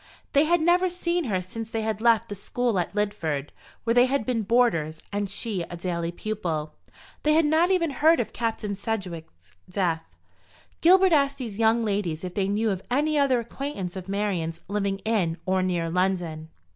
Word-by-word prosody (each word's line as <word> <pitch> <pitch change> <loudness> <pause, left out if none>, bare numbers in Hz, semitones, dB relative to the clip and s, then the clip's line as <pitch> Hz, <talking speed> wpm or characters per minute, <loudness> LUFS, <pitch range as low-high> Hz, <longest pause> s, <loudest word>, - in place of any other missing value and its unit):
They 285 +2 +5
had 345 +1 +3
never 355 +3 +3
seen 350 -1 -1
her 190 -6 -1
since 225 +5 -7
they 225 -1 -2
had 220 -1 -2
left 230 -1 +4
the - - -5
school 225 +1 -1
at 175 +3 -3
Lidford, 165 -9 -1 0.3
where 230 - +2
they 245 +1 +5
had 270 -4 0
been 240 -2 0
boarders, 195 -9 +2
and 205 -1 -1
she 200 -1 -1
a 175 +1 -6
daily 170 -1 -2
pupil. 175 -6 -3 0.5
They 305 - +3
had 320 0 +4
not 320 +4 +3
even 345 -5 +2
heard 315 +4 +4
of 225 -2 -2
Captain 220 -3 -2
Sedgewick's 170 - -6 0.2
death. 175 -4 0 0.8
Gilbert 370 +1 +6
asked 280 -2 +3
these 230 -5 -6
young 225 +1 +3
ladies 195 -6 -1
if 180 -1 -5
they 195 0 0
knew 210 +2 +1
of 190 -1 -3
any 300 +5 +1
other 265 -3 +3
acquaintance 235 -6 -5
of 190 0 -7
Marian's 185 -5 -2
living 200 0 -1
in 190 -7 +1
or 190 0 +1
near 175 -2 0
London. 175 -3 -1
210 Hz, 185 wpm, -26 LUFS, 180-250 Hz, 0.8 s, Gilbert